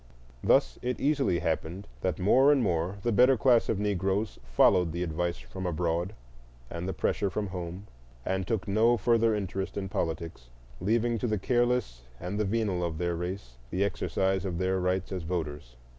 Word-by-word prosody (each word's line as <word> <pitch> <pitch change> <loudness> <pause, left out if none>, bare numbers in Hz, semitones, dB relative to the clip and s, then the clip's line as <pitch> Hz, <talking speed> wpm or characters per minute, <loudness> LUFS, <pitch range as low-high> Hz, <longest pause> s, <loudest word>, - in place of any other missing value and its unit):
Thus - - +3
it 125 0 -2
easily 140 - +2
happened 80 +5 -2
that 95 - -1
more 130 +9 +5
and 140 -4 +3
more 90 0 0
the 120 - +1
better 125 +4 +5
class 120 0 +4
of - - +1
Negroes 100 +1 -1
followed 85 +7 +4
the 85 +1 -2
advice 85 -1 -2
from 65 +10 -6
abroad 85 +3 -1 0.6
and 85 +1 -4
the - - 0
pressure 100 +3 0
from 105 +3 -2
home, 90 +1 -6 0.4
and 95 -1 -1
took 110 -6 -1
no 115 +4 +3
further 115 -2 +3
interest 95 -1 -3
in 95 -1 -3
politics, 80 -7 -4 0.3
leaving 115 +3 +1
to 120 - -1
the 110 -1 0
careless 120 - 0 0.2
and 90 +4 -4
the 105 - +1
venal 100 -4 0
of 85 -2 -2
their 85 0 -1
race 90 -8 -5
the 95 +6 0
exercise 95 -1 0
of 90 -3 -3
their 95 +1 0
rights 90 0 -1
as 95 -2 -3
voters. 75 -7 -4
95 Hz, 175 wpm, -29 LUFS, 85-110 Hz, 0.6 s, more